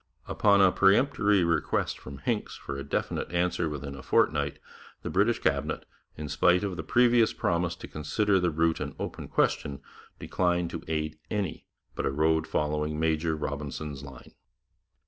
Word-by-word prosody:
Upon 100 Hz, -1 st, +4 dB
a 95 Hz, -1 st, +6 dB
peremptory 105 Hz, -1 st, +3 dB
request 85 Hz, -1 st, 0 dB
from 70 Hz, +1 st, -9 dB
Hincks -, -, -2 dB
for 70 Hz, -, -6 dB
a 70 Hz, -, -5 dB
definite -, -, -2 dB
answer 85 Hz, -1 st, 0 dB
within 75 Hz, -2 st, -5 dB
a 70 Hz, -, -9 dB
fortnight, -, -, +1 dB, 0.5 s
the -, -, -4 dB
British 105 Hz, +5 st, +3 dB
Cabinet, -, -, -1 dB, 0.3 s
in 75 Hz, -, -5 dB
spite 90 Hz, +6 st, +3 dB
of 100 Hz, -3 st, -2 dB
the 85 Hz, -, -4 dB
previous 120 Hz, +6 st, +4 dB
promise 85 Hz, 0 st, 0 dB
to -, -, -9 dB
consider 95 Hz, +7 st, +1 dB
the 90 Hz, -1 st, +2 dB
route 80 Hz, +1 st, +1 dB
an -, -, -5 dB
open -, -, -5 dB
question, 70 Hz, -1 st, 0 dB, 0.4 s
declined 90 Hz, -2 st, 0 dB
to 80 Hz, -, -5 dB
aid 80 Hz, 0 st, -2 dB
any 100 Hz, -6 st, -3 dB, 0.3 s
but -, -, -2 dB
a -, -, 0 dB
road 80 Hz, +3 st, +2 dB
following 75 Hz, 0 st, -1 dB
Major 80 Hz, 0 st, +1 dB
Robinson's 70 Hz, -1 st, -5 dB
line. 70 Hz, -3 st, -12 dB
80 Hz, 160 wpm, -28 LUFS, 75-95 Hz, 0.5 s, a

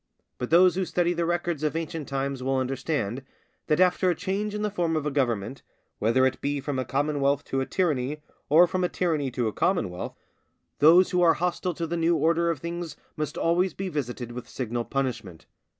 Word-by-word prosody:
But 125 Hz, -, -3 dB
those 180 Hz, +2 st, +6 dB
who 190 Hz, -, -1 dB
study 175 Hz, -1 st, +1 dB
the 170 Hz, -1 st, -1 dB
records 175 Hz, -3 st, -1 dB
of 155 Hz, 0 st, -1 dB
ancient 165 Hz, -2 st, -4 dB
times 135 Hz, -1 st, -2 dB
will 135 Hz, +1 st, 0 dB
understand, 130 Hz, -2 st, -2 dB, 0.5 s
that 155 Hz, +1 st, +2 dB
after 185 Hz, 0 st, +3 dB
a 175 Hz, -, +1 dB
change 200 Hz, +3 st, -2 dB
in 210 Hz, -, -2 dB
the 210 Hz, -, 0 dB
form 170 Hz, -4 st, 0 dB
of 155 Hz, -2 st, -1 dB
a 150 Hz, -, 0 dB
government, 125 Hz, -3 st, -1 dB, 0.4 s
whether 115 Hz, +4 st, +3 dB
it 130 Hz, 0 st, -1 dB
be 145 Hz, 0 st, -1 dB
from 140 Hz, -1 st, -3 dB
a 130 Hz, -, -2 dB
commonwealth 140 Hz, 0 st, 0 dB
to 135 Hz, -, -2 dB
a 130 Hz, -, -3 dB
tyranny 150 Hz, -4 st, -1 dB, 0.3 s
or 160 Hz, +5 st, +7 dB
from 185 Hz, +1 st, -2 dB
a 180 Hz, -, +1 dB
tyranny 155 Hz, -6 st, 0 dB
to 125 Hz, -2 st, -1 dB
a 110 Hz, -, -2 dB
commonwealth, 100 Hz, -, -1 dB, 0.6 s
those 170 Hz, +6 st, +6 dB
who 180 Hz, -1 st, +2 dB
are 165 Hz, -2 st, +5 dB
hostile 180 Hz, +1 st, -1 dB
to 170 Hz, -, -2 dB
the 170 Hz, +1 st, -3 dB
new 165 Hz, +1 st, +2 dB
order 165 Hz, +2 st, +2 dB
of 165 Hz, -, 0 dB
things 170 Hz, +2 st, -5 dB, 0.2 s
must 150 Hz, 0 st, -4 dB
always 175 Hz, +3 st, +1 dB
be 195 Hz, -1 st, -3 dB
visited 125 Hz, -6 st, -4 dB
with 120 Hz, -1 st, -8 dB
signal 120 Hz, -1 st, -3 dB
punishment. 115 Hz, -11 st, -3 dB
150 Hz, 205 wpm, -26 LUFS, 130-175 Hz, 0.6 s, or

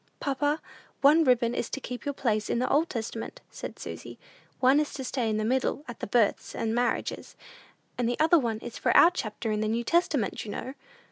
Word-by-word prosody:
"Papa, 290 Hz, +2 st, 0 dB, 0.4 s
one 300 Hz, +4 st, +6 dB
ribbon 245 Hz, -3 st, +3 dB
is 240 Hz, -, -2 dB
to -, -, -4 dB
keep 250 Hz, -2 st, -7 dB
your 285 Hz, -, -1 dB
place 215 Hz, -5 st, 0 dB
in -, -, +1 dB
the 250 Hz, -, +1 dB
Old 315 Hz, +4 st, +2 dB
Testament," 225 Hz, -1 st, -5 dB
said -, -, -7 dB
Susy; -, -, -8 dB, 0.4 s
"one 265 Hz, +3 st, +5 dB
is 300 Hz, -, -1 dB
to 265 Hz, -, -5 dB
stay 250 Hz, -3 st, -1 dB
in 215 Hz, -, 0 dB
the 215 Hz, -, -1 dB
middle, 260 Hz, +4 st, 0 dB
at 240 Hz, -, -8 dB
the -, -, -4 dB
births 215 Hz, 0 st, +1 dB
and 220 Hz, 0 st, -1 dB
marriages; 245 Hz, +1 st, -1 dB, 0.6 s
and 240 Hz, -1 st, +1 dB
the 245 Hz, -, -2 dB
other 320 Hz, +2 st, +5 dB
one 230 Hz, -5 st, -1 dB
is 240 Hz, -, -7 dB
for -, -, +3 dB
our 340 Hz, -, +8 dB
chapter 225 Hz, -, -3 dB
in 210 Hz, 0 st, 0 dB
the 215 Hz, -, 0 dB
New 230 Hz, +2 st, 0 dB
Testament, 305 Hz, -, +1 dB
you 215 Hz, -, -8 dB
know." 255 Hz, +5 st, -5 dB
245 Hz, 215 wpm, -28 LUFS, 225-285 Hz, 0.6 s, our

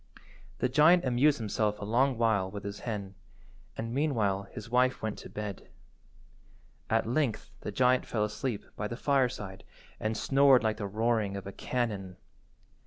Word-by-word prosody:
The -, -, +1 dB
giant 155 Hz, +6 st, +5 dB
amused 130 Hz, +4 st, +3 dB
himself 105 Hz, -1 st, -1 dB
a 105 Hz, -, -5 dB
long 125 Hz, +4 st, +2 dB
while 110 Hz, -5 st, +2 dB
with 100 Hz, +1 st, -7 dB
his 100 Hz, 0 st, -6 dB
hen, 100 Hz, -4 st, -5 dB, 0.6 s
and 115 Hz, +1 st, -4 dB
meanwhile 110 Hz, -9 st, 0 dB
his 110 Hz, -3 st, -8 dB
wife 125 Hz, +1 st, +2 dB
went 110 Hz, -1 st, -3 dB
to -, -, -10 dB
bed. 105 Hz, -2 st, -6 dB, 1.2 s
At -, -, +2 dB
length 120 Hz, -4 st, -1 dB
the -, -, -5 dB
giant 125 Hz, +4 st, +3 dB
fell 110 Hz, -2 st, 0 dB
asleep 105 Hz, +1 st, -4 dB
by 105 Hz, -, -3 dB
the 120 Hz, -, -6 dB
fireside 125 Hz, -9 st, 0 dB, 0.4 s
and 110 Hz, 0 st, -1 dB
snored 135 Hz, -1 st, +5 dB
like 110 Hz, -1 st, 0 dB
the 100 Hz, -, -3 dB
roaring 110 Hz, -1 st, 0 dB
of 100 Hz, -, -7 dB
a 100 Hz, -, -6 dB
cannon. 100 Hz, -7 st, -3 dB
110 Hz, 160 wpm, -30 LUFS, 105-125 Hz, 1.2 s, giant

